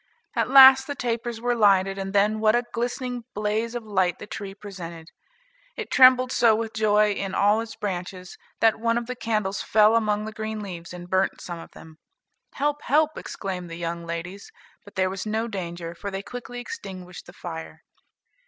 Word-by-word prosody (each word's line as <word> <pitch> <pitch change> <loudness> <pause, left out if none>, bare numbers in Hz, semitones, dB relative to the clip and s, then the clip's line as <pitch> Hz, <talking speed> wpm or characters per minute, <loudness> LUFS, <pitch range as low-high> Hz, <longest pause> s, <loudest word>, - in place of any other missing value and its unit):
At - - +1
last 265 0 +9
the 285 - -4
tapers 235 -2 -3
were 245 +1 0
lighted, 195 -3 +3
and 195 0 -4
then 205 +2 +2
what 215 +1 +4
a 240 - +2
glistening 245 +1 -3
blaze 215 +3 -1
of 240 - -4
light 190 -4 0
the - - -9
tree 200 -2 -7
presented! 170 -5 -9 0.7
It - - -6
trembled 255 -1 +6
so 230 -4 +4
with 225 0 -3
joy 210 -1 +3
in 195 -1 -3
all 205 +2 +3
its 225 -1 -8
branches, 185 -2 -5 0.3
that 225 -1 +4
one 230 +1 +1
of 240 - -2
the 250 +1 -5
candles 215 -5 -1
fell 215 +1 +4
among 210 -2 +1
the 220 - -5
green 220 0 -5
leaves 175 -5 -7
and 175 0 -9
burnt 190 +1 0
some 175 -2 -7
of - - -11
them. 160 0 -14 0.5
"Help! 290 +1 -1
help!" 305 +3 +2
exclaimed 185 -3 -6
the 165 - -6
young 170 0 -4
ladies, 170 +4 -6 0.3
but 205 - -16
there 185 -1 +1
was 195 +2 -5
no 220 +2 -1
danger, 175 -5 -5
for 200 +4 -6
they 195 0 -5
quickly 245 +1 -7
extinguished 185 - -8
the - - -11
fire. 165 -3 -8
210 Hz, 190 wpm, -25 LUFS, 185-230 Hz, 0.7 s, last